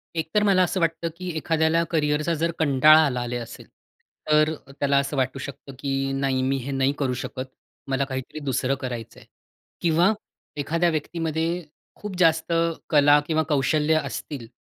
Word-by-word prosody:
एकतर 160 +6 0
मला 195 -3 +4
असं 185 +1 -1
वाटतं 165 0 0
की 185 0 -5
एखाद्याला 160 +1 +2
करियरचा 155 0 +1
जर 165 +1 +1
कंटाळा 155 +1 +6
आला 125 -3 -1
ले 120 - -3
असेल 115 -1 -9 0.6
तर 155 +1 +4 0.3
त्याला 140 0 +2
असं 140 +1 -1
वाटू 130 +1 -1
शकतं 140 0 -8
की 135 -1 -1
"नाही, 135 -1 0
मी 135 +1 +1
हे 135 +2 -5
नाही 135 +1 +1
करू 130 -3 0
शकत. 130 0 -5 0.4
मला 135 0 0
काहीतरी 130 +3 -5
दुसरं 135 -1 0
करायच 120 -3 -6
आहे." - - -15 0.6
किंवा 170 +5 +3 0.4
एखाद्या 165 +4 +1
व्यक्तीमध्ये 160 0 -2 0.5
खूप 210 -2 -7
जास्त 165 -1 +3 0.4
कला 145 -1 +6
किंवा 160 -1 +1
कौशल्य 150 +2 +2
असतील. 135 -7 -6
150 Hz, 155 wpm, -24 LUFS, 135-165 Hz, 0.6 s, कंटाळा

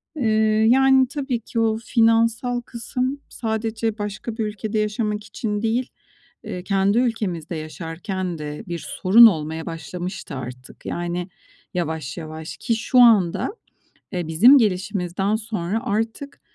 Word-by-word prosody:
Eee, 220 -4 +2
yani, 265 0 +5
tabii 270 -3 -3
ki 230 +1 -4
o 220 -1 +2
finansal 230 +2 +2
kısım 250 +4 -3
sadece 220 -1 -2
başka 210 +3 -5
bir 220 - 0
ülkede 215 +1 -3
yaşamak 210 0 -1
için 210 -1 -3
değil, 235 +3 0 0.5
eee, 180 - -6
kendi 195 +2 +2
ülkemizde 200 -9 -1
yaşarken 165 +3 -5
de 150 0 -6
bir 170 -1 -4
sorun 220 +6 +7
olmaya 160 -5 +1
başlamıştı 175 0 -6
artık 125 0 -9
yani 175 +1 -3 0.4
yavaş 160 -3 -3
yavaş. 160 -1 -7
Ki 230 - 0
şu 245 +3 +2
anda, 225 - +4 0.6
eee, 175 -3 -3
bizim 225 - +7
gelişimizden 195 -1 0
sonra 215 -1 -3
artık 225 +7 -3
210 Hz, 125 wpm, -22 LUFS, 175-230 Hz, 0.6 s, sorun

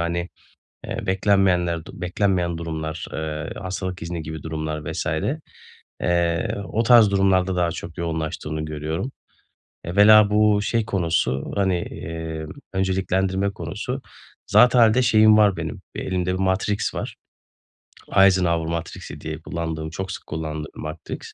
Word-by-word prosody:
hani, 85 +1 -1 0.6
eee, - - -4
beklenmeyenler, 95 -3 +2
du 95 - -11
beklenmeyen 90 -2 0
durumlar, 80 -1 -4
eee, 80 0 -4
hastalık 95 -1 -4
izni 85 0 -4
gibi 80 -1 -7
durumlar, 80 -1 -4
vs. 80 - -3 1.0
eee, 85 -2 +1
o 110 +5 0
tarz 115 -3 +7
durumlarda 95 -1 +2
daha 85 -1 +1
çok 85 0 -7
yoğunlaştığını 80 -2 -3
görüyorum. 80 - -4 0.7
Evvela 105 +3 +6
bu 105 -1 +4
şey 115 +1 0
konusu, 85 - 0
hani, 95 -2 +2
emm, 80 -2 -6 0.2
önceliklendirme 95 0 0
konusu. - - -5 0.4
Zatıalde 120 0 +5
şeyim 110 -3 +6
var 105 -4 +4
benim, 80 -2 -5
elimde 90 -1 -1
bir - - -2
Matrix 95 +2 0
var. - - -5 1.0
Eisenhower 90 -4 +4
Matrix'i 85 -1 -5
diye 80 0 -5
kullandığım, 80 -1 -4
çok 95 +4 -5
sık - - -8
kullandığım 75 -1 -5
Matrix. 75 +1 -6
90 Hz, 125 wpm, -23 LUFS, 80-95 Hz, 1.0 s, tarz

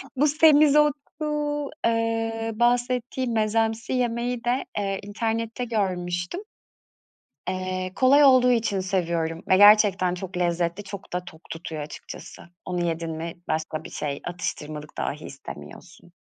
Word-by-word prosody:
Bu 295 +3 +3
semizotu, 300 -1 +5 0.9
ııı, 225 0 -1
bahsettiğim 245 0 +1
mezemsi 225 +2 0
yemeği 240 -1 -1
de, 245 +2 0
eee, 195 -1 -1
internette 225 +3 -2
görmüştüm. 180 - -2 1.1
Eee, 185 0 -3
kolay 275 +3 +6
olduğu 255 -2 +6
için 220 -5 +1
seviyorum 170 -3 -1
ve 185 - +5
gerçekten 205 -3 +6
çok 180 0 -6
lezzetli. 175 +2 0
Çok 195 -2 -9
da 180 0 -2
tok 160 -1 -12
tutuyor 160 -2 -6
açıkçası. 150 - -9 0.2
Onu 180 -1 -2
yedin 165 0 -2
mi, 165 +1 -5
başka 155 0 -2
bir - - -9
şey, 140 -2 -4
atıştırmalık 150 -4 -5
dahi 150 +2 -3
istemiyorsun. 135 - -11
200 Hz, 120 wpm, -25 LUFS, 175-240 Hz, 1.1 s, kolay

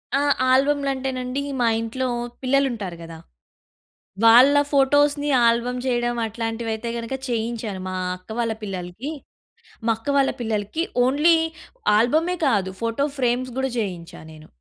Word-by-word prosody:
ఆ! 275 - +2 0.3
ఆల్బమ్లంటేనండి 270 -1 0 0.2
మా 235 - +3
ఇంట్లో 255 +3 -3 0.4
పిల్లలు 275 +2 +3
ఉంటారు 195 -7 -6
కదా! 165 0 -9 1.1
వాళ్ళ 245 +5 +8 0.2
ఫోటోస్‌ని 290 +1 +3 0.2
ఆల్బమ్ 240 +2 +1
చేయడం 240 -1 0
అట్లాంటివయితే 225 0 -4
గనక 235 +3 -4
చేయించాను. 225 -4 -3
మా 185 - -4 0.2
అక్క 185 - -29
వాళ్ళ 230 -2 0
పిల్లలకి. 190 - -5 0.7
మా 230 - +3
అక్క 225 +5 -7
వాళ్ళ 275 - +3
పిల్లలకి 220 +5 -2 0.2
ఓన్లీ 300 +6 +4 0.6
ఆల్బ‌మే 315 +10 +2
కాదు, 195 -6 +1
ఫోటో 230 +5 0
ఫ్రేమ్స్ 250 +1 0
కూడా 265 0 -1
చేయించా 180 -5 -5
నేను. 155 0 -14
240 Hz, 125 wpm, -23 LUFS, 220-270 Hz, 1.1 s, వాళ్ళ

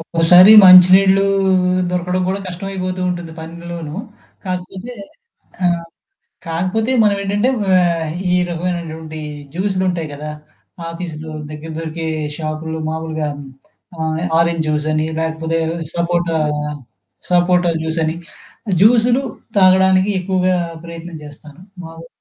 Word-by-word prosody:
ఒక్కోసారి 170 +4 +6
మంచినీళ్లు 190 +2 +7 0.7
దొరకడం 180 +1 -1
కూడా 195 +1 -1
కష్టమైపోతూ 185 0 -5
ఉంటుంది 175 -2 -6
పనిలోనూ. 170 -1 -8 0.5
కాకపోతే 185 +5 -5 0.7
ఆహ్, 170 -1 +1 0.7
కాకపోతే 185 +8 -1
మనం 205 -1 +3
ఏంటంటే 205 +5 0 0.3
ఆహ్, 170 -3 0 0.2
ఈ - - +2 0.2
రకమైనటువంటి 165 -2 -5 0.3
జ్యూస్లుంటాయి 185 -4 -1
గదా! 150 +1 -6 0.6
ఆఫీసులో 160 -2 -7 0.2
దగ్గర 155 +2 -8
దొరికే 165 0 -5 0.3
షాపులో 160 0 -4
మామూలుగా 160 -1 -3 0.7
ఆహ్, 160 0 -2 0.2
ఆరెంజ్ 170 -1 +1
జ్యూస్ 150 0 -1
అని, 155 0 0
లేకపోతే 160 0 -2 0.3
సపోటా, 170 -1 0 0.9
సపోటా 175 -1 +3
జ్యూసని. 160 0 -1 0.7
జ్యూస్లు 240 +4 +4 0.4
తాగడానికి 190 +1 +4
ఎక్కువగా 185 0 0 0.3
ప్రయత్నం 170 0 -9
చేస్తాను. 150 +2 -13 0.2
మా 165 - -9
హ్మ్. 165 - -11
170 Hz, 100 wpm, -17 LUFS, 160-185 Hz, 0.9 s, మంచినీళ్లు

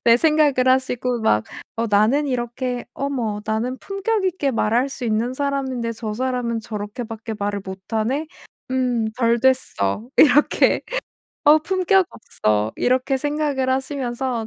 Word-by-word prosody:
네 235 0 +7
생각을 295 -3 +3
하시고 250 -2 +1
막 110 - +3 0.4
어 230 - +1
나는 215 +8 +3
이렇게 245 -1 -3
'어머 245 -7 -2
나는 230 +4 -1
품격있게 390 -6 -1
말할 235 +3 +1
수 265 -2 -6
있는 230 +2 0
사람인데 265 -4 -2
저 220 -1 -5
사람은 250 -1 -1
저렇게 210 +3 -5
밖에 225 0 -6
말을 205 -1 -2
못 190 0 -6
하네. 240 +8 0 0.5
음 250 -3 +1
덜 235 -1 +2
됐어.' 240 - +1
이렇게. 295 -1 +5 0.6
'어 300 +1 +7
품격 375 +2 +2
없어.' 105 - -1
이렇게 260 +2 +1
생각을 290 -2 -1
하시면서 260 -3 -2
250 Hz, 280 characters per minute, -21 LUFS, 225-275 Hz, 0.6 s, 네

